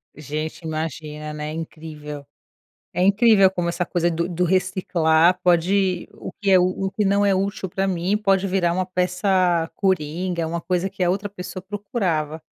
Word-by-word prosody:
Gente, 155 Hz, +3 st, -5 dB
imagina, 155 Hz, -1 st, -4 dB
né, 150 Hz, 0 st, -5 dB
incrível. 155 Hz, -2 st, -7 dB, 0.7 s
É 180 Hz, -, +1 dB
incrível 200 Hz, -1 st, +5 dB
como 175 Hz, -2 st, -2 dB
essa 175 Hz, +1 st, -1 dB
coisa 175 Hz, -1 st, 0 dB
do 170 Hz, +1 st, -1 dB
do 180 Hz, 0 st, 0 dB
reciclar 175 Hz, -2 st, +2 dB
pode 180 Hz, +1 st, +2 dB
o -, -, -8 dB
que 200 Hz, -, +1 dB
é 185 Hz, -, +7 dB
u 185 Hz, +2 st, 0 dB
o -, -, -2 dB
que 210 Hz, +1 st, -1 dB
não 200 Hz, +1 st, +3 dB
é 195 Hz, -, +3 dB
útil 195 Hz, 0 st, -2 dB
pra 195 Hz, +2 st, -1 dB
mim, 185 Hz, +2 st, 0 dB
pode 195 Hz, -2 st, +2 dB
virar 180 Hz, -2 st, +1 dB
uma 185 Hz, +1 st, -1 dB
peça 180 Hz, -2 st, +1 dB
coringa, 175 Hz, -1 st, -1 dB
é -, -, -1 dB
uma 170 Hz, +1 st, -3 dB
coisa 180 Hz, +2 st, -1 dB
que 190 Hz, -2 st, -2 dB
a 175 Hz, -, +2 dB
outra 200 Hz, +2 st, -2 dB
pessoa 185 Hz, -1 st, -8 dB
procurava. 185 Hz, -7 st, -2 dB
180 Hz, 175 wpm, -22 LUFS, 160-195 Hz, 0.7 s, é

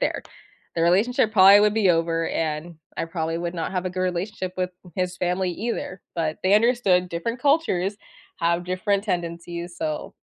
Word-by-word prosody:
there. -, -, -1 dB, 0.5 s
The 165 Hz, -, +1 dB
relationship 215 Hz, +6 st, +3 dB
probably 195 Hz, -1 st, +8 dB
would 210 Hz, 0 st, +4 dB
be 215 Hz, -4 st, +3 dB
over, 165 Hz, 0 st, +1 dB
and 160 Hz, +1 st, -3 dB, 0.2 s
I -, -, -1 dB
probably 165 Hz, -1 st, -3 dB
would 170 Hz, +1 st, -4 dB
not 165 Hz, +2 st, -3 dB
have 185 Hz, 0 st, -2 dB
a -, -, -2 dB
good 185 Hz, +1 st, -4 dB
relationship 185 Hz, +1 st, -3 dB
with 180 Hz, 0 st, 0 dB, 0.3 s
his 180 Hz, -1 st, -1 dB
family 180 Hz, +1 st, 0 dB
either, 205 Hz, -2 st, -4 dB
but 160 Hz, -2 st, -1 dB
they 185 Hz, -, +2 dB
understood 210 Hz, -6 st, +3 dB
different 205 Hz, +9 st, -3 dB
cultures 250 Hz, -, +1 dB, 0.4 s
have 170 Hz, +1 st, +1 dB
different 195 Hz, +2 st, 0 dB
tendencies, 170 Hz, -1 st, -4 dB
so, 155 Hz, -2 st, -3 dB
180 Hz, 170 wpm, -24 LUFS, 170-200 Hz, 0.5 s, probably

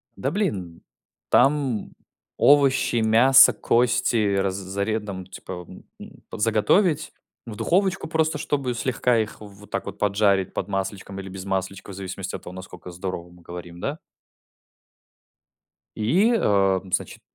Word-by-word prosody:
Да, 135 Hz, -, -2 dB
блин. 95 Hz, -, -3 dB, 0.5 s
Там 135 Hz, -6 st, +2 dB, 0.5 s
овощи, 140 Hz, -4 st, +4 dB
мясо, 120 Hz, +5 st, +6 dB
кости 115 Hz, -4 st, +2 dB
раз 95 Hz, -1 st, 0 dB
заре 100 Hz, +3 st, -2 dB
там, 95 Hz, -3 st, -7 dB
типа, 90 Hz, -1 st, -9 dB
м, 90 Hz, -, -13 dB, 0.2 s
м, -, -, -10 dB, 0.2 s
п -, -, -7 dB
заготовить. 125 Hz, -, +2 dB, 0.3 s
В 110 Hz, -, -7 dB
духовочку 190 Hz, -, 0 dB
просто, 160 Hz, -1 st, +1 dB
чтобы 135 Hz, -4 st, -2 dB
слегка 125 Hz, 0 st, +1 dB
их 110 Hz, 0 st, -3 dB
вот 105 Hz, 0 st, -13 dB
так -, -, -2 dB
вот -, -, -7 dB
поджарить 100 Hz, -2 st, +1 dB
под 95 Hz, -, -3 dB
масличком 95 Hz, 0 st, -4 dB
или 95 Hz, 0 st, -7 dB
без 95 Hz, 0 st, -8 dB
масличка, 95 Hz, +1 st, -3 dB
в -, -, -8 dB
зависимости 95 Hz, 0 st, -5 dB
от -, -, -8 dB
того, 90 Hz, -, -9 dB
насколько 95 Hz, -1 st, -10 dB
здорово 90 Hz, -1 st, -5 dB
мы 90 Hz, 0 st, -18 dB
говорим, 85 Hz, 0 st, -9 dB
да? 145 Hz, -, -4 dB, 1.9 s
И 180 Hz, -, +2 dB
о, 95 Hz, -, +2 dB
м, 95 Hz, -, -13 dB
значит: -, -, -2 dB
105 Hz, 145 wpm, -24 LUFS, 95-130 Hz, 1.9 s, мясо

